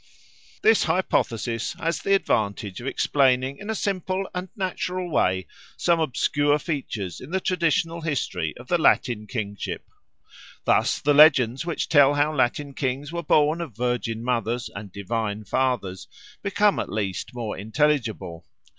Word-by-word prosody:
This 220 Hz, 0 st, +5 dB
hypothesis 120 Hz, -, 0 dB
has 165 Hz, +1 st, -2 dB
the 195 Hz, -, +3 dB
advantage 100 Hz, -, -1 dB
of 125 Hz, -, -6 dB
explaining 135 Hz, -1 st, +2 dB
in 205 Hz, -, -8 dB
a 220 Hz, -, 0 dB
simple 190 Hz, -1 st, -2 dB
and 180 Hz, +1 st, -4 dB
natural 185 Hz, -2 st, -3 dB
way 95 Hz, -8 st, +1 dB, 0.3 s
some 170 Hz, -1 st, +2 dB
obscure 145 Hz, 0 st, +1 dB
features 130 Hz, -, -4 dB
in 130 Hz, -, -9 dB
the 190 Hz, +2 st, 0 dB
traditional 170 Hz, -2 st, 0 dB
history 95 Hz, -, -2 dB
of 120 Hz, -, -12 dB
the 175 Hz, -, +2 dB
Latin 115 Hz, -8 st, +2 dB
kingship. 100 Hz, -5 st, -4 dB, 0.8 s
Thus -, -, +2 dB
the 145 Hz, -, +2 dB
legends 135 Hz, -2 st, +5 dB
which 170 Hz, -, -2 dB
tell 145 Hz, -2 st, +5 dB
how 145 Hz, +2 st, +2 dB
Latin 140 Hz, +1 st, 0 dB
kings 135 Hz, +2 st, -3 dB
were 170 Hz, 0 st, -3 dB
born 155 Hz, +1 st, +3 dB
of 140 Hz, -11 st, -7 dB
virgin 120 Hz, -2 st, -1 dB
mothers 120 Hz, -1 st, -1 dB
and 100 Hz, -1 st, -8 dB
divine 105 Hz, +1 st, -3 dB
fathers 105 Hz, -4 st, -1 dB, 0.3 s
become 205 Hz, +1 st, +2 dB
at -, -, -3 dB
least 100 Hz, +1 st, -3 dB
more 115 Hz, -3 st, -4 dB
intelligible. 110 Hz, -, -1 dB
135 Hz, 145 wpm, -24 LUFS, 110-165 Hz, 0.8 s, This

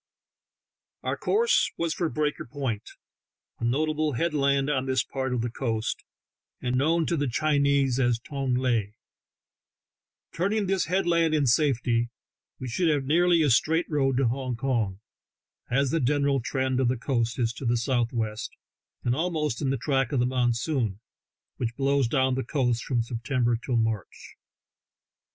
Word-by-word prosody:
Our -, -, -1 dB
course 460 Hz, +3 st, +2 dB
was 165 Hz, -1 st, 0 dB
for 170 Hz, -3 st, -1 dB
Breaker 150 Hz, -1 st, -2 dB
Point, 125 Hz, -5 st, -4 dB, 0.7 s
a -, -, -6 dB
notable 155 Hz, +4 st, 0 dB
headland 140 Hz, -1 st, +1 dB
on 135 Hz, -3 st, 0 dB
this 130 Hz, -2 st, +1 dB
part 130 Hz, -1 st, -3 dB
of 125 Hz, -2 st, 0 dB
the 120 Hz, 0 st, -2 dB
coast, 115 Hz, -3 st, -2 dB, 0.6 s
and 125 Hz, 0 st, -1 dB
known 160 Hz, +5 st, +2 dB
to 170 Hz, -, 0 dB
the 145 Hz, -2 st, 0 dB
Chinese 140 Hz, -1 st, +2 dB
as 120 Hz, -2 st, +2 dB
Tong 135 Hz, +1 st, -2 dB
Lae; 115 Hz, -5 st, 0 dB, 1.4 s
turning 200 Hz, +5 st, 0 dB
this 190 Hz, -1 st, +1 dB
headland 170 Hz, -3 st, +2 dB
in 145 Hz, -2 st, +2 dB
safety, 120 Hz, -3 st, +2 dB, 0.5 s
we 130 Hz, -, -6 dB
should 165 Hz, +8 st, +1 dB
have 145 Hz, -3 st, +1 dB
nearly 170 Hz, +3 st, +4 dB
a 145 Hz, -, +3 dB
straight 160 Hz, +8 st, +2 dB
road 135 Hz, -3 st, +1 dB
to 135 Hz, -2 st, +3 dB
Hong 130 Hz, +1 st, -2 dB
Kong, 115 Hz, -6 st, -1 dB, 0.7 s
as 135 Hz, +1 st, +1 dB
the 165 Hz, -, +1 dB
general 140 Hz, 0 st, +2 dB
trend 130 Hz, +1 st, -1 dB
of 130 Hz, -, +2 dB
the 125 Hz, +1 st, +1 dB
coast 115 Hz, -2 st, -1 dB
is 120 Hz, -2 st, 0 dB
to 125 Hz, -, -7 dB
the 120 Hz, +1 st, +2 dB
southwest, 115 Hz, -3 st, -1 dB, 0.5 s
and 120 Hz, -, +1 dB
almost 155 Hz, -5 st, -1 dB
in 135 Hz, -, 0 dB
the 135 Hz, -, 0 dB
track 135 Hz, 0 st, 0 dB
of 140 Hz, -, +1 dB
the 120 Hz, -, +3 dB
mon 125 Hz, -1 st, +1 dB
soon, 115 Hz, -, -1 dB, 0.6 s
which 120 Hz, -1 st, -3 dB
blows 140 Hz, -2 st, +2 dB
down 130 Hz, +1 st, +2 dB
the 130 Hz, +1 st, -1 dB
coast 125 Hz, -3 st, 0 dB
from 120 Hz, -3 st, 0 dB
Septem 120 Hz, +2 st, -2 dB
ber 120 Hz, 0 st, +3 dB
till 120 Hz, +1 st, -2 dB
March. 110 Hz, -4 st, -3 dB
130 Hz, 160 wpm, -26 LUFS, 120-150 Hz, 1.4 s, nearly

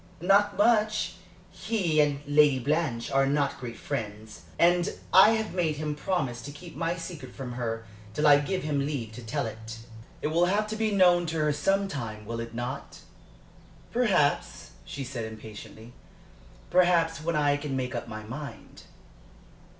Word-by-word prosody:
"Not 200 Hz, +3 st, +3 dB
much. 215 Hz, 0 st, +3 dB, 0.4 s
He 175 Hz, -9 st, +1 dB
and 145 Hz, -1 st, +1 dB
Lady 145 Hz, -1 st, +5 dB
Blanche 135 Hz, -3 st, -1 dB
are 135 Hz, 0 st, +3 dB
not 140 Hz, 0 st, 0 dB
great 120 Hz, -3 st, -7 dB
friends. 105 Hz, -2 st, -5 dB, 0.2 s
And 175 Hz, +2 st, +3 dB, 0.2 s
I 200 Hz, +4 st, +8 dB
have 220 Hz, -1 st, -2 dB
made 170 Hz, -4 st, 0 dB
him 150 Hz, 0 st, -3 dB
promise 145 Hz, -6 st, -2 dB
to 145 Hz, -, -7 dB
keep 165 Hz, +3 st, -11 dB
my 165 Hz, +2 st, -1 dB
secret 165 Hz, -1 st, -8 dB
from 130 Hz, -3 st, -6 dB
her 115 Hz, -2 st, -3 dB, 0.3 s
till 150 Hz, -, +1 dB
I 145 Hz, -1 st, +8 dB
give 185 Hz, +6 st, -2 dB
him 150 Hz, -2 st, 0 dB
leave 135 Hz, -6 st, -3 dB
to 110 Hz, -, -9 dB
tell 115 Hz, 0 st, -2 dB
it." 115 Hz, 0 st, -7 dB, 0.5 s
"It -, -, +1 dB
will 170 Hz, +3 st, +3 dB
have 205 Hz, +4 st, +1 dB
to 215 Hz, -, -3 dB
be 220 Hz, 0 st, 0 dB
known 180 Hz, -3 st, +4 dB
to 160 Hz, +1 st, -2 dB
her 150 Hz, -1 st, +2 dB
some 195 Hz, +7 st, +1 dB
time, 110 Hz, -, -6 dB
will 115 Hz, +2 st, -4 dB
it 115 Hz, 0 st, -6 dB
not?" 120 Hz, +3 st, -5 dB, 0.9 s
"Perhaps," 195 Hz, -12 st, +1 dB
she 140 Hz, -, -5 dB
said, 125 Hz, -3 st, -5 dB
impatiently. 110 Hz, +1 st, -10 dB, 0.8 s
"Perhaps, 170 Hz, -4 st, +3 dB
when 170 Hz, 0 st, -1 dB
I 145 Hz, -1 st, +3 dB
can 145 Hz, -1 st, -3 dB
make 125 Hz, -1 st, -2 dB
up 120 Hz, -, -4 dB
my 110 Hz, -1 st, -7 dB
mind." 140 Hz, +7 st, -9 dB
150 Hz, 165 wpm, -28 LUFS, 120-175 Hz, 0.9 s, I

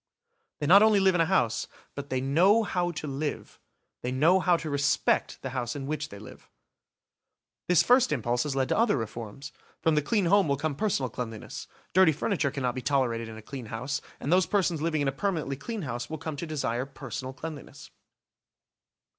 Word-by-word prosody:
They 145 Hz, -, -2 dB
not 190 Hz, +7 st, +8 dB
only 215 Hz, -2 st, +5 dB
live 190 Hz, -1 st, +4 dB
in 175 Hz, -, +2 dB
a 165 Hz, -, +2 dB
house, 120 Hz, -, +1 dB, 0.3 s
but 140 Hz, 0 st, -7 dB
they 130 Hz, -, 0 dB
know 180 Hz, -, +4 dB
how 180 Hz, -4 st, -1 dB
to 155 Hz, -3 st, -5 dB
live, 145 Hz, +1 st, -4 dB, 0.4 s
they 125 Hz, -, -3 dB
know 160 Hz, +9 st, +4 dB
how 180 Hz, -2 st, +3 dB
to 165 Hz, -, -6 dB
respect 145 Hz, 0 st, +1 dB
the 130 Hz, -, -4 dB
house 120 Hz, -1 st, -3 dB
in 140 Hz, -2 st, -5 dB
which 150 Hz, +1 st, -3 dB
they 100 Hz, -, -10 dB
live. 105 Hz, -, -13 dB, 1.2 s
This 180 Hz, -3 st, +5 dB
first 250 Hz, -5 st, +4 dB
impulse 120 Hz, -3 st, 0 dB
has 145 Hz, -1 st, -2 dB
led 135 Hz, -1 st, 0 dB
to -, -, +1 dB
other 230 Hz, -9 st, +3 dB
reforms. 115 Hz, +4 st, -6 dB, 0.3 s
From 160 Hz, -, +2 dB
the 150 Hz, -, +3 dB
clean 200 Hz, +6 st, +1 dB
home 200 Hz, +1 st, +4 dB
will 140 Hz, -1 st, +1 dB
come 155 Hz, +1 st, -1 dB
personal 140 Hz, -, -1 dB
cleanliness. 115 Hz, -2 st, -6 dB, 0.3 s
Dirty 185 Hz, -3 st, +6 dB
furniture 160 Hz, -1 st, 0 dB
cannot 130 Hz, -3 st, -2 dB
be 130 Hz, -, -4 dB
tolerated 120 Hz, -5 st, 0 dB
in 110 Hz, -, -9 dB
a 110 Hz, -, -11 dB
clean 130 Hz, -1 st, -7 dB
house, 125 Hz, +6 st, -3 dB, 0.2 s
and 145 Hz, -, 0 dB
those 185 Hz, -2 st, +4 dB
persons 180 Hz, -6 st, +1 dB
living 155 Hz, -2 st, 0 dB
in 140 Hz, -, +1 dB
a -, -, +2 dB
permanently 155 Hz, -3 st, -2 dB
clean 220 Hz, -, -5 dB
house 120 Hz, -3 st, -4 dB
will 160 Hz, -, -4 dB
come 155 Hz, 0 st, -5 dB
to 170 Hz, -, -5 dB
desire 135 Hz, -4 st, -2 dB
personal 135 Hz, -1 st, -6 dB
cleanliness. 155 Hz, +2 st, -9 dB
145 Hz, 200 wpm, -28 LUFS, 130-175 Hz, 1.2 s, not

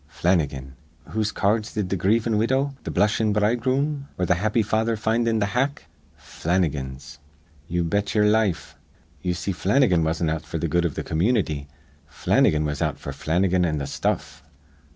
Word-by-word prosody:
Flannigan. 75 Hz, -5 st, -1 dB, 0.4 s
Whose 110 Hz, -1 st, -1 dB
ca 100 Hz, -, +1 dB
ards 110 Hz, 0 st, -1 dB
did 100 Hz, -4 st, -2 dB
th' 95 Hz, -, +1 dB
grievin' 110 Hz, +4 st, +2 dB
widow, 135 Hz, +5 st, +1 dB
th' -, -, -4 dB
blushin' 105 Hz, +2 st, +2 dB
bridegroom, 130 Hz, +7 st, 0 dB
or 90 Hz, -, 0 dB
th' -, -, -1 dB
happy 105 Hz, +5 st, +2 dB
father 110 Hz, +2 st, 0 dB
find 115 Hz, +2 st, +1 dB
in 115 Hz, -1 st, +2 dB
th' -, -, +1 dB
hack? 135 Hz, +7 st, -1 dB, 0.3 s
Flannigan's. 70 Hz, -5 st, -3 dB, 0.5 s
Ye 85 Hz, +1 st, -1 dB
bet 100 Hz, +5 st, -1 dB
ye'er 105 Hz, -1 st, +4 dB
life. 105 Hz, -4 st, +1 dB, 0.5 s
Ye 90 Hz, -, -1 dB
see 90 Hz, +3 st, -3 dB
Flannigan 95 Hz, -, +2 dB
wasn't 80 Hz, 0 st, 0 dB
out 80 Hz, -1 st, -2 dB
f'r 80 Hz, +1 st, -5 dB
th' 80 Hz, 0 st, -2 dB
good 85 Hz, +1 st, +2 dB
iv 80 Hz, -, -2 dB
th' -, -, -4 dB
community. 80 Hz, -, 0 dB, 0.4 s
Flannigan 75 Hz, 0 st, +2 dB
was 75 Hz, -1 st, -3 dB
out -, -, 0 dB
f'r 70 Hz, -, -6 dB
Flannigan 90 Hz, +5 st, +1 dB
an' 80 Hz, -3 st, 0 dB
th' 70 Hz, -, -3 dB
stuff. -, -, -2 dB
95 Hz, 175 wpm, -24 LUFS, 80-110 Hz, 0.5 s, ye'er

